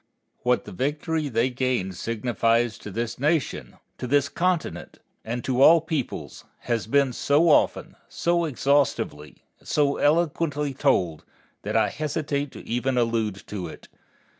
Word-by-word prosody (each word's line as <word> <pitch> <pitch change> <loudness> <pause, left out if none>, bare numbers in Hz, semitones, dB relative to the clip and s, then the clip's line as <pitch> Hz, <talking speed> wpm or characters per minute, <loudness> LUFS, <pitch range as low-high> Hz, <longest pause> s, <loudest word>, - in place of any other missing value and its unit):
What 125 -4 +1
the - - -9
victory 150 - -2
they 120 +1 +1
gained 125 -7 -1
signifies 115 +1 0
to - - -8
this 115 +4 -4
Nation, 150 +1 -1 0.2
to 125 - -4
this 140 +1 +2
continent, 175 +3 -2 0.3
and 120 +2 -4
to 130 0 0
all 165 +4 +8
peoples, 155 -5 -4 0.2
has 115 -3 -2
been 140 +1 +2
so 150 +7 +3
often, - - +2
so 170 0 0
exhaustively, 135 - 0 0.2
and - - -20
so 145 -2 +2
eloquently 150 -2 +1
told, 85 - +1 0.4
that - - -1
I - - +3
hesitate 145 -2 -2
to - - -11
even 125 +2 -1
allude 110 -5 0
to 95 -4 -5
it. - - -12
130 Hz, 140 wpm, -25 LUFS, 115-150 Hz, 0.4 s, all